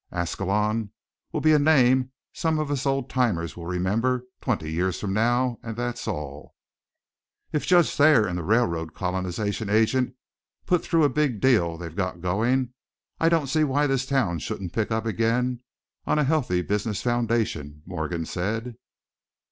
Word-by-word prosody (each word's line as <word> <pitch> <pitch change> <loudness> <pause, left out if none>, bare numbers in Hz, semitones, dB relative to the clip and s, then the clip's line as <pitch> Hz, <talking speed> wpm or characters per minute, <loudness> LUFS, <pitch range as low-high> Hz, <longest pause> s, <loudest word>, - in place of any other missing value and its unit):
Ascalon 105 +5 -1 0.4
will - - -2
be 155 0 +5
a 150 - +5
name 130 -4 +4 0.2
some 160 -1 0
of 155 -2 -2
us 140 0 -1
old 135 -2 0
timers 100 - 0
will 85 -1 -8
remember 110 +8 0 0.2
twenty 100 - -2
years 90 +3 -1
from 95 -2 -2
now, 120 +3 +1
and 115 -1 -6
that's 120 0 -3
all." 75 -1 -6 1.0
"If 150 - -2
Judge 175 -2 +5
Thayer 145 -7 +5
and 90 -3 -3
the 90 - -2
railroad 85 -6 0
colonization 95 +3 -2
agent 115 +4 +2 0.5
put 180 -2 +2
through 165 -2 +2
a 145 - +5
big 140 -5 0
deal 95 -11 +3
they've 85 -1 -8
got 95 -3 -2
going, 115 +8 0 0.5
I 165 - +4
don't 165 -3 +2
see 155 +4 +1
why 145 0 +2
this 135 -2 0
town 120 -12 +1
shouldn't 90 +3 -5
pick 110 -2 -1
up 110 0 -1
again 120 +2 0 0.5
on - - +2
a 150 - +3
healthy 130 - +1
business 105 +1 -2
foundation," 115 - -1
Morgan 85 -1 -3
said. 110 +8 -3
115 Hz, 160 wpm, -25 LUFS, 90-130 Hz, 1.0 s, be